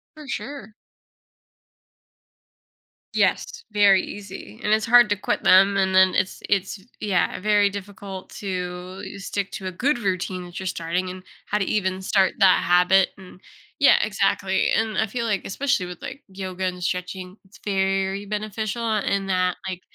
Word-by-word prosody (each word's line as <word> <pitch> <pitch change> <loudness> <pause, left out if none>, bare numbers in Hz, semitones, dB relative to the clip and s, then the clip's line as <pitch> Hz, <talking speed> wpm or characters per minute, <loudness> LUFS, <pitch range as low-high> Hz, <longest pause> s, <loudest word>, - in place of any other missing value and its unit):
For 305 -2 -11
sure. 265 -7 -6 2.4
Yes, 465 - 0
very 200 -2 +5
easy, 190 - -9
and 210 - 0
it's 215 0 +3
hard 240 -1 +6
to 205 - +2
quit 200 - -2
them, 195 +2 +6
and 190 -1 +1
then 190 0 +6
it's 185 - -1
it's 195 0 0 0.2
yeah, 195 -4 0
very 205 0 +3
difficult 200 -1 -8
to 185 -1 -5 0.2
stick 200 0 -3
to 190 - -6
a 185 - -2
good 255 +9 0
routine 185 -3 -2
that 175 +1 -8
you're 190 - -4
starting 180 +2 -2
and 185 0 -8 0.2
how 210 - 0
to 195 - 0
even 190 -2 -1
start 190 -1 +2
that 190 -2 +5
habit, 180 +2 +4
and, 185 0 -14 0.4
yeah, 280 - +7
exactly, 195 -2 +1
and 225 -1 +1
I 220 - +1
feel 235 +2 -3
like, 210 -3 0
especially 260 -4 -1
with, 180 -1 -9
like, 280 - -7
yoga 190 -1 -5
and 180 -1 -3
stretching, 180 +2 -4
it's 190 - -19
very 195 0 0
beneficial 215 +1 -2
in 195 -1 -1
that, 185 -1 +1
like, 185 -1 -5
195 Hz, 160 wpm, -23 LUFS, 185-210 Hz, 2.4 s, yeah